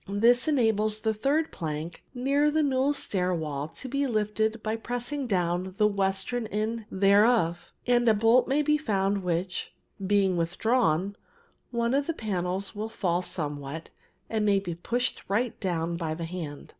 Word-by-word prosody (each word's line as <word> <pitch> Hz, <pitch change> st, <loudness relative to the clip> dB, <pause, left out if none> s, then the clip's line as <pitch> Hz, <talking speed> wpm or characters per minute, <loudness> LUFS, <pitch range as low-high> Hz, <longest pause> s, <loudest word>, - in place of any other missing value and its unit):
This 235 Hz, +6 st, +4 dB
enables 215 Hz, -6 st, +2 dB
the 220 Hz, 0 st, +1 dB
third 285 Hz, +9 st, 0 dB
plank 160 Hz, 0 st, -5 dB
near 280 Hz, +4 st, +2 dB
the 310 Hz, +1 st, +2 dB
newel 270 Hz, 0 st, +2 dB
stair 185 Hz, -10 st, -1 dB
wall 150 Hz, -3 st, -3 dB
to 260 Hz, -, -8 dB
be 275 Hz, +2 st, 0 dB
lifted 220 Hz, 0 st, 0 dB
by 220 Hz, 0 st, -1 dB
pressing 245 Hz, +4 st, -3 dB
down 180 Hz, -2 st, -1 dB
the 210 Hz, -, +4 dB
western 200 Hz, +3 st, 0 dB
end 215 Hz, +2 st, -2 dB
thereof, 195 Hz, -3 st, +3 dB
and 240 Hz, -1 st, +3 dB
a 220 Hz, -, +5 dB
bolt 225 Hz, +4 st, +4 dB
may 285 Hz, +3 st, +2 dB
be 300 Hz, +1 st, +2 dB
found 200 Hz, -7 st, 0 dB
which, 180 Hz, +1 st, -2 dB, 0.3 s
being 195 Hz, -2 st, +2 dB
withdrawn, 190 Hz, +1 st, +1 dB, 0.5 s
one 235 Hz, 0 st, 0 dB
of 280 Hz, +1 st, +1 dB
the 330 Hz, -, -1 dB
panels 190 Hz, -, -2 dB
will 215 Hz, +1 st, -4 dB
fall 180 Hz, -5 st, 0 dB
somewhat 150 Hz, -2 st, -1 dB, 0.4 s
and 220 Hz, -1 st, -1 dB
may 205 Hz, -1 st, +4 dB
be 180 Hz, -3 st, -5 dB
pushed 240 Hz, +9 st, -2 dB
right 225 Hz, +5 st, -1 dB
down 170 Hz, -3 st, -1 dB
by 160 Hz, -2 st, -3 dB
the 165 Hz, 0 st, -4 dB
hand. 165 Hz, -4 st, -7 dB
210 Hz, 160 wpm, -27 LUFS, 180-240 Hz, 0.5 s, a